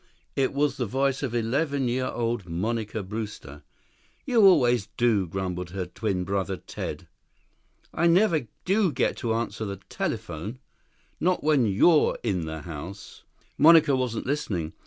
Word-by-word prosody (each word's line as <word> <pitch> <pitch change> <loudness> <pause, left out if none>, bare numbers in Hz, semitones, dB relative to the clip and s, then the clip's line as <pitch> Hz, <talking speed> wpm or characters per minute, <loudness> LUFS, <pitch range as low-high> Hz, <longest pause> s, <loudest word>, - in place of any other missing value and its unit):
It 135 -1 +1
was 145 +1 0
the 125 - -1
voice 135 +4 0
of 125 -4 -3
eleven 135 +4 0
year 130 +2 0
old 115 -6 -2
Monica 110 +4 -2
Brewster. 100 -8 -7 0.6
"You 240 -5 +3
always 120 - +4
do," 110 -6 +2
grumbled 90 0 -4
her 95 +1 -4
twin 95 0 -2
brother 95 0 -2
Ted. - - -7 0.9
"I 170 - +2
never 170 - +3 0.2
do 195 -1 +2
get - - 0
to 115 -2 -1
answer 115 -1 -3
the 100 -2 -4
telephone. 100 +11 -4 0.6
Not 180 +1 +1
when 145 -6 +3
you're 150 - +4
in 95 -8 -1
the 80 -1 -6
house." 85 +5 -9
6 - - -37
Monica 160 -3 +7
wasn't 125 -3 -2
listening. 100 - -2
115 Hz, 145 wpm, -26 LUFS, 95-140 Hz, 0.9 s, Monica